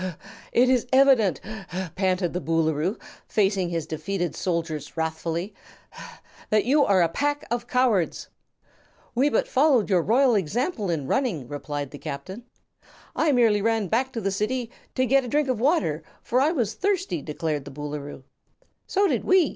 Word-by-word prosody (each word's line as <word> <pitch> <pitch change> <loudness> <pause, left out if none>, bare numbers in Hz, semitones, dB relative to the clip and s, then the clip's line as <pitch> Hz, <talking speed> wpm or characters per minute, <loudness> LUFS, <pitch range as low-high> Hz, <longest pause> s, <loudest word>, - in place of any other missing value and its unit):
"It 245 +2 +4
is 250 -2 +2
evident," 260 - +4 0.5
panted 185 -2 0
the 180 - -2
Boolooroo, 160 +4 0 0.3
facing 195 -3 +1
his 165 -2 -2
defeated 170 +1 -3
soldiers 165 -4 -3
wrathfully, 165 +3 -2 1.0
"that 215 -1 +2
you 285 +4 +4
are 195 -7 +4
a - - +3
pack 290 - -1
of 240 0 -2
cowards!" 245 -10 +1 0.9
"We 265 +5 +3
but - - +1
followed 260 -7 +3
your 185 - +5
own - - -9
royal 250 +3 +4
example 215 - -1
in 160 -5 -1
running," 190 - -1
replied 145 0 -5
the 145 - -9
Captain. 190 +12 -7 0.7
"I 315 -1 +2
merely 230 -5 +3
ran 225 -3 0
back 255 +4 +1
to 230 - -3
the 195 -1 -1
City 225 +4 -2 0.2
to 255 - +2
get 270 +2 +3
a - - -6
drink 295 +4 +1
of 255 -4 -1
water, 260 - +1 0.2
for 250 +2 +1
I 300 +3 +3
was 235 - -1
thirsty," 335 - -1
declared 150 -1 -3
the 140 - -8
Boolooroo. 145 -1 -6 0.6
"So 400 +1 +2
did - - 0
we! 370 -5 +4
205 Hz, 165 wpm, -25 LUFS, 165-255 Hz, 1.0 s, your